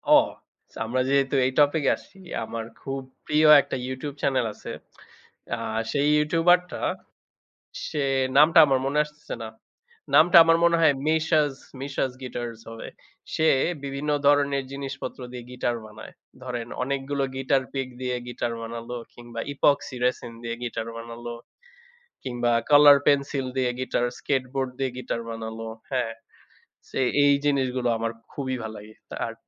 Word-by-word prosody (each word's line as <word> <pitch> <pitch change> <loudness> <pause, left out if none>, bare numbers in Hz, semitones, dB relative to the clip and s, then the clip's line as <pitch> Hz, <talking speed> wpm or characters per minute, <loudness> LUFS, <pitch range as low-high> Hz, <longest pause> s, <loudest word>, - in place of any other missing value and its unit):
ও! - - +9 0.5
So - - -12
আমরা 130 +3 0
যেহেতু 140 0 +2
এই 130 - +1
topic-এ 145 0 +4
আসছি, 195 - -18 0.3
আমার 115 0 -5 0.2
খুব 135 0 -4 0.3
প্রিয় 155 +1 +4
একটা - - -5
YouTube 130 +2 -5
channel 130 -3 +1
আছে। - - -9 0.8
আ - - -7 0.3
সেই 145 0 +1
YouTuber-টা, 170 +3 +2 1.1
সে 150 -3 -2 0.3
নামটা 160 +3 +7
আমার 135 -2 +2
মনে 140 +2 0
আসতেছে 150 -3 -9
না। 110 - -6 0.7
নামটা 170 +2 +7
আমার 165 0 +4
মনে 170 0 +5
হয় 155 -3 +6
Mishas, 155 -3 +2 0.3
Mishas 135 -2 -2
Guitars 120 -2 -5
হবে। 115 0 -8 0.5
সে 160 0 +2 0.4
বিভিন্ন 140 +2 -4 0.2
ধরনের 140 -1 +3
জিনিসপত্র 135 -2 -6
দিয়ে 125 -1 -7
guitar 120 -1 -1
বানায়। 110 0 -11 0.3
ধরেন 120 -2 -4 0.2
অনেকগুলো 140 +1 -2
guitar 135 0 +1
pick 135 -1 -2
দিয়ে 125 -1 -1
guitar 120 -1 -3
বানালো 115 +1 -6 0.2
কিংবা 120 -1 -9
epoxy 140 -1 +2
resin 125 -2 -1
দিয়ে 115 0 -3
guitar 115 -1 -4
বানালো। 115 +1 -7 0.9
কিংবা 120 -2 -1 0.2
color 145 -1 +9
pencil 140 -1 +2
দিয়ে 125 -1 +2
guitar, 125 -1 -1 0.2
skateboard 130 -1 -1
দিয়ে 135 -2 0
guitar 120 -2 -3
বানালো। 115 0 -6 0.2
হ্যাঁ, 120 -3 -1 0.8
ছে - - -4 0.3
এই 140 - +6
জিনিসগুলো 130 -3 +1
আমার 115 0 -2 0.2
খুবই 130 -2 -3
ভাল 110 - -5
লাগে। 105 +1 -12 0.2
তার - - -3
135 Hz, 140 wpm, -25 LUFS, 120-145 Hz, 1.1 s, ও